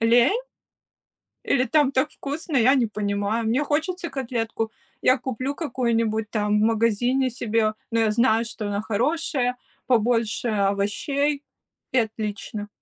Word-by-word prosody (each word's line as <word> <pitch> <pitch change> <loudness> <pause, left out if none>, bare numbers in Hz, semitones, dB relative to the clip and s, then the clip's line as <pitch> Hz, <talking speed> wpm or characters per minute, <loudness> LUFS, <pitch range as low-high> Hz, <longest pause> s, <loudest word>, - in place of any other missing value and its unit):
Лень? 240 - +4 1.0
Или 255 -2 +2
там 290 +2 +3
так 275 +3 +1
вкусно, 290 +2 -4
я 255 +3 +5
не 245 - +3
понимаю? 210 +1 -1
Мне 255 +6 +1
хочется 335 +4 -1
котлетку, 230 -4 -3 0.3
я 255 +1 +4
куплю 260 +2 -3
какую-нибудь 230 -7 0
там 210 -1 +1
в - - +2
магазине 230 +4 +2
себе. 225 -2 0 0.2
Но 230 - 0
я 220 -1 +3
знаю, 235 0 +3
что 220 -2 -5
она 205 0 -1
хорошая, 250 +2 0 0.3
побольше 235 -1 +1
овощей- 220 +9 0 0.5
и 260 - +3
отлично. 215 -1 -3
235 Hz, 130 wpm, -24 LUFS, 215-265 Hz, 1.0 s, я